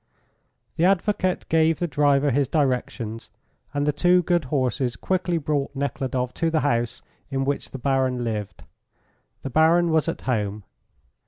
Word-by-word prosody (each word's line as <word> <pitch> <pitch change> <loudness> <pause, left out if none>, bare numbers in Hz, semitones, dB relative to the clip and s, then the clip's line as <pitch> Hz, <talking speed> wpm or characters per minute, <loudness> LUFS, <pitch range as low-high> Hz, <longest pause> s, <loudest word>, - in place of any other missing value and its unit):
The 165 - +3
advocate 190 0 +1
gave 160 -1 +3
the 175 - -1
driver 145 -2 +2
his 140 0 +1
directions, 125 -6 -1 0.4
and 145 +1 -1
the 150 - +3
two 180 +4 +3
good 175 -3 +1
horses 130 -2 -1
quickly 180 -2 -1
brought 145 -2 -2
Nekhludoff 130 -2 -2
to 165 - 0
the 160 -1 +1
house 120 -4 -1 0.3
in 135 -1 -1
which 140 +1 -2
the - - -7
Baron 130 -1 +1
lived. 110 -4 -4 0.8
The 135 - -5
Baron 165 +3 +4
was 160 +1 +2
at - - -5
home. 105 -4 -2
140 Hz, 150 wpm, -24 LUFS, 125-165 Hz, 0.8 s, Baron